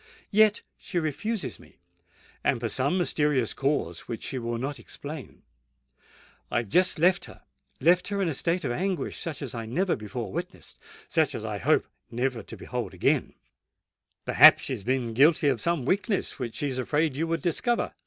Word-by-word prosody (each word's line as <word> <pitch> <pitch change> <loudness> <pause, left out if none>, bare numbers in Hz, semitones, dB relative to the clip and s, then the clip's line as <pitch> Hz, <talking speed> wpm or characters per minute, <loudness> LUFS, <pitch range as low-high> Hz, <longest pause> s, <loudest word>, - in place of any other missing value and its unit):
Yet 215 0 +4 0.2
she 180 - -5
refuses 175 +7 -2
me—and - - -6
for 115 -1 -2
some 135 - +1
mysterious 150 - +1
cause 135 - -1
which 115 - -5
she 130 - -3
will 120 0 -3
not 135 +4 -4
explain. 145 -2 -9 1.1
I - - 0
have 115 - -11
just 180 - +3
left 175 +3 +3
her,—left 175 +5 -1
her 200 -1 -2
in 195 - +1
a 160 - 0
state 170 +6 0
of 125 - 0
anguish 180 +2 -2
such 155 -3 -5
as 130 - -6
I 115 -2 -5
never 180 +10 +1
before 110 -1 -6
witnessed—such - - -3
as - - -5
I - - -3
hope - - +3 0.2
never 120 0 -1
to 100 - -11
behold - - -5
again!" - - +1 0.9
"Perhaps - - +8
she - - -3
has - - -5
been 125 0 -1
guilty 150 +5 +5
of 130 -4 0
some 170 -7 0
weakness 195 - 0
which 120 -3 -4
she 145 - -1
is 130 -1 -3
afraid 150 +2 0
you 160 +4 -1
would 165 -2 -2
discover?" 235 +8 0
145 Hz, 175 wpm, -27 LUFS, 125-175 Hz, 1.1 s, Perhaps